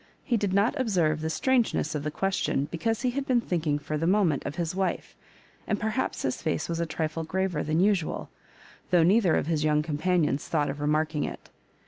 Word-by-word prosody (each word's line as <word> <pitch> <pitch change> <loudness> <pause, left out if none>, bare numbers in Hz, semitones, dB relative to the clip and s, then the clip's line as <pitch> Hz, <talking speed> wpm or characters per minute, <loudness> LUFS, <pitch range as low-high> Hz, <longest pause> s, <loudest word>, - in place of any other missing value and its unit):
He 245 - 0
did 205 -3 0
not 200 +5 +3
observe 170 - +1
the 160 - -2
strangeness 240 - +1
of 150 - -2
the 150 - -2
question, 185 -5 -1
because 225 +6 -1
he 250 - +2
had 275 +2 -3
been 250 -2 +3
thinkuig.for 155 -6 -1
the 165 - 0
moment 185 -7 +2
of 145 - -5
his 170 -1 -2
wife, 190 0 -2 0.5
and 210 - 0
perhaps 220 +4 -2
his 130 -1 -2
face 155 -1 -1
was 170 0 -2
a 170 - -1
trifle 160 0 -2
graver 180 -1 -1
than 155 +2 0
usual, 190 -3 +1 0.6
though 175 -2 +5
neither 190 0 +4
of - - 0
his 155 -2 0
young 150 -1 +2
companions 155 -1 0
thought 145 -3 0
of 145 +1 -7
remarking 150 0 +1
it. - - -7
165 Hz, 195 wpm, -27 LUFS, 155-195 Hz, 0.6 s, though